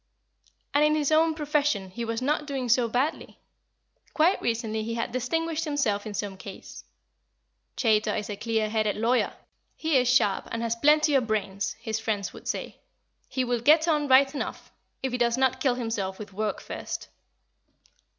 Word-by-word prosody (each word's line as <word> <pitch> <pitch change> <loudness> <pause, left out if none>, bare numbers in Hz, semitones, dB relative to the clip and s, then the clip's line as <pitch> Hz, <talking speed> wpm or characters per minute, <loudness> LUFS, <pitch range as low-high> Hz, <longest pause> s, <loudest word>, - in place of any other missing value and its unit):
And 290 +1 +4
in 305 0 +4
his 300 -1 0
own 320 +1 +4
profession 290 - 0
he 235 +5 -5
was 230 +2 -3
not 295 +2 0
doing 265 -4 -3
so 240 0 +4
badly. 265 +7 -1 0.8
Quite 340 +5 +3
recently 225 -1 -1
he 230 +1 -3
had 230 0 -2
distinguished 320 +6 -1
himself 260 -10 -1
in 210 - -6
some 200 -1 -4
case. 195 0 -10 0.9
"Chaytor 215 -3 +2
is 210 - -3
a 205 - -4
clear 220 0 -1
headed 215 -1 0
lawyer; 235 +4 +1 0.4
he 315 -3 +1
is 250 -1 +2
sharp 220 -6 +2
and 230 0 -2
has 230 0 0
plenty 300 +4 +4
of 260 -4 +3
brains," 200 -2 -1
his 220 -1 -4
friends 210 -3 -2
would - - -11
say; - - -4 0.5
"he 260 - -1
will 245 -1 -1
get 310 +6 +5
on 300 -3 +2
right 270 +1 +5
enough, 285 - -5 0.3
if 265 - -1
he 250 - -2
does 235 0 +2
not 260 -1 +2
kill 260 -3 +2
himself 225 -6 -3
with 205 -2 -9
work 210 0 -2
first." - - -6
240 Hz, 175 wpm, -27 LUFS, 215-290 Hz, 0.9 s, get